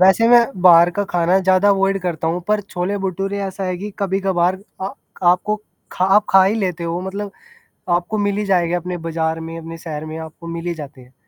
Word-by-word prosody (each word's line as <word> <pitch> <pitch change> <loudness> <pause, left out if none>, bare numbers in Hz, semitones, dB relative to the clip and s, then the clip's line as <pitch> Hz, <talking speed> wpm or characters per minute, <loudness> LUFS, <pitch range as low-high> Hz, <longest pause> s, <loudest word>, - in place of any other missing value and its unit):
वैसे 190 +5 +5
मैं 240 0 +8 0.2
बाहर 175 -1 +7
का 205 - +1
खाना 180 0 +2
ज़्यादा 185 +1 +3
अवॉइड 195 0 +2
करता 165 -3 -2
हूँ, 175 +2 -1
पर 210 0 +2
छोले-भटूरे 195 0 -3
ऐसा 195 0 -4
है 185 -1 -2
कि 205 +2 -6
कभी-कभार 190 -2 0 0.2
अ, 190 - -2 0.3
आपको 180 +4 +3 0.4
खा 180 - 0
आप 210 - +4
खा 190 0 +7
ही 195 +3 +2
लेते 180 -6 -2
हो, 170 +1 -2
मतलब 195 +2 -5 0.7
आपको 180 +5 -4
मिल 205 0 0
ही 210 - -1
जाएगा 175 -3 +1
अपने 180 +1 -4
बज़ार 160 0 -1
में, 165 0 -7
अपने 165 0 -8
शहर 155 -2 -6
में 155 +1 -6
आपको 160 +1 -10
मिल 165 0 -5
ही 170 - -1
जाते 145 -4 -10
हैं। 125 +1 -19
180 Hz, 210 wpm, -19 LUFS, 170-195 Hz, 0.7 s, मैं